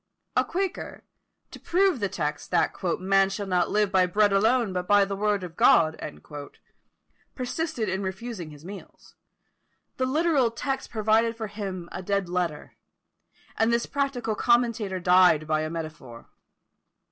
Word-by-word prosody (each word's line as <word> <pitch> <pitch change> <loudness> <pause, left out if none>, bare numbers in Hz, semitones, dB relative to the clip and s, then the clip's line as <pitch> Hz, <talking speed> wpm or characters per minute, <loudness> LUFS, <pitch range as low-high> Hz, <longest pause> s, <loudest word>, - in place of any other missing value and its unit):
A - - +4
quaker, 380 0 -4 0.5
to - - -10
prove 370 -4 +2
the 200 -2 -1
text 150 -4 -3
that 175 - +2 0.3
"Man 195 +1 +3
shall 200 +1 -4
not 180 -2 +1
live 210 -1 +1
by 185 -1 +4
bread 205 +2 +3
alone, 220 +1 +2
but 180 0 -3
by 205 -1 +5
the 195 0 -4
word 205 -1 0
of 170 -2 -8
God," 160 -2 +5 1.4
persisted 255 -1 -3
in 190 +1 -2
refusing 190 -2 -5
his 150 +1 -13
meals. 195 +2 -11 0.8
The 255 - 0
literal 295 -3 +2
text 270 +4 -4
proved 225 +1 +1
for 225 - -4
him 195 -4 -6
a - - -5
dead 200 0 -1
letter, 175 -4 -3 0.8
and 225 +1 +2
this 235 0 +1
practical 275 -5 -2
commentator 230 -4 +1
died 180 -3 +5
by 155 0 0
a 155 - -3
metaphor. 155 -8 -8
200 Hz, 145 wpm, -26 LUFS, 180-235 Hz, 1.4 s, by